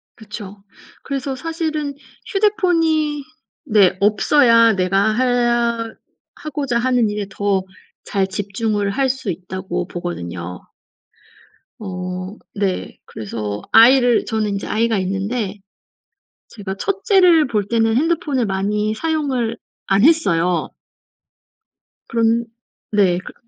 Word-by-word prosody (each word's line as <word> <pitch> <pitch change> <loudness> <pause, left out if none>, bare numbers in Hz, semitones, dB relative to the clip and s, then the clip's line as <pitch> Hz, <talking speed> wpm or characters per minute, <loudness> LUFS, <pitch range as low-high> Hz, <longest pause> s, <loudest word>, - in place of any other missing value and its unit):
그쵸. 210 -2 -10 0.4
그래서 275 -1 -3
사실은 310 -1 -3 0.3
휴대폰이 330 -7 +1 0.4
네 205 -7 +4
없어야 230 +2 +4
내가 195 +3 +1
해야 240 -2 +1 0.4
하고자 280 -5 -3
하는 245 -3 +2
일에 205 -1 -3
더 195 -1 0 0.4
잘 195 -2 0
집중을 205 +1 -2
할 265 +5 +1
수 260 -6 -2
있다고 180 0 -5
보거든요. 90 - -6 1.2
어 185 0 -6 0.2
네. 195 -2 -2
그래서 105 -1 -5
아이를 245 0 +6
저는 220 -2 -1
인제 200 0 -4
아이가 225 0 +1
있는데 195 +2 -2 0.9
제가 195 -3 -7
1 395 0 -2
째를 360 - +5
볼 210 -5 -1
때는 225 -1 +2
핸드폰을 300 -5 +1
많이 210 +2 -1
사용을 265 -5 -1 0.3
안 195 +1 +2
했어요. 180 - +2 1.4
그런 230 0 +1 0.5
네 195 -4 +3
그 185 - -11
220 Hz, 210 characters per minute, -19 LUFS, 195-265 Hz, 1.4 s, 아이를